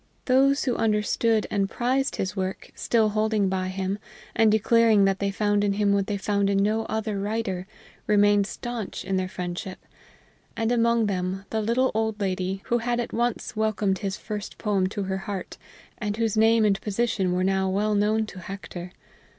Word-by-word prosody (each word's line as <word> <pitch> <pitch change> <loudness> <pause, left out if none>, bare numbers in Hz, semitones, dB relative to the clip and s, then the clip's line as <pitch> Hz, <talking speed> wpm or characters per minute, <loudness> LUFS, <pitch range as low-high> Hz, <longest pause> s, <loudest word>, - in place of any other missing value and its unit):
Those 275 +2 +4
who 250 -3 0
understood 215 0 +1
and 195 -1 +1
prized 260 +4 0
his 190 +2 -3
work, 190 -1 -4
still 225 -2 +2
holding 215 -2 +1
by 185 -1 -1
him, 190 +1 -3 0.4
and 225 -2 +5
declaring 220 -1 +4
that 195 0 +1
they 200 - 0
found 205 0 +1
in 200 -1 +2
him 200 0 +2
what 200 0 +1
they 205 -2 -1
found 200 0 0
in 200 - +2
no 215 +3 +1
other 220 -2 -2
writer, 200 -3 -2 0.4
remained 205 -1 +4
stanch 240 -4 -5
in 195 - -1
their 185 0 -1
friendship, 180 +1 -5 0.8
and 225 0 0
among 235 -1 +3
them 190 -1 -2
the 220 - 0
little 240 +4 +1
old 220 0 -1
lady 190 -1 -2
who 240 - +1
had 240 +1 -1
at 240 - -3
once 240 0 -1
welcomed 215 -3 0
his 200 -1 -3
first 210 -1 -6
poem 200 -4 +1
to 200 +1 -4
her 190 0 -2
heart 190 0 -6 0.4
and 210 -1 -2
whose 225 -2 0
name 225 0 +4
and 195 -2 +2
position 210 -3 0
were 180 +1 +1
now 190 0 +1
well 210 +3 +1
known 215 +2 +2
to 195 -3 -10
Hector. 185 -1 -8
205 Hz, 185 wpm, -25 LUFS, 195-225 Hz, 0.8 s, and